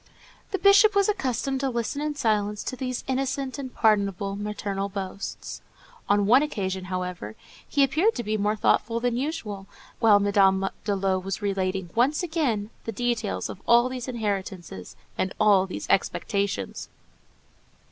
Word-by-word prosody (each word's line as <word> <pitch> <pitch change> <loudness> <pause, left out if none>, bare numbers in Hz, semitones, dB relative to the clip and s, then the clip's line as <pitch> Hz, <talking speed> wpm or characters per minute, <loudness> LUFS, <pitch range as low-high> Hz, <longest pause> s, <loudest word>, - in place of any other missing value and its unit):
The 390 - -1
Bishop 400 +2 +6
was 400 -1 +4
accustomed 270 - -1
to 270 0 0
listen 240 +3 -2
in 300 0 -2
silence 210 -5 0
to - - -4
these 255 -1 -4
innocent 270 +1 -2
and 260 -2 -5
pardonable 200 -3 +1
maternal 200 -1 -3
boasts. 195 0 -6 0.5
On 205 0 +3
one 245 +6 +6
occasion, 190 -10 -2
however, 180 - -4 0.3
he 285 - +3
appeared 315 - +2
to 240 - -3
be 215 0 -1
more 210 0 +1
thoughtful 230 +2 +1
than 245 0 0
usual, 235 -8 -4 0.3
while 215 -3 +6
Madame 195 -1 +3 0.2
de 205 - +1
Lô 190 -1 0
was 195 +1 -4
relating 190 -2 -1
once 270 +8 +2
again 265 -11 -1
the 225 - -3
details 235 -1 -1
of 185 - -9
all 240 +1 +5
these 255 -1 -5
inheritances 195 - -4 0.2
and 185 - -1
all 200 -3 +5
these 185 - -6
"expectations." 200 - -1
215 Hz, 150 wpm, -26 LUFS, 195-260 Hz, 0.5 s, Bishop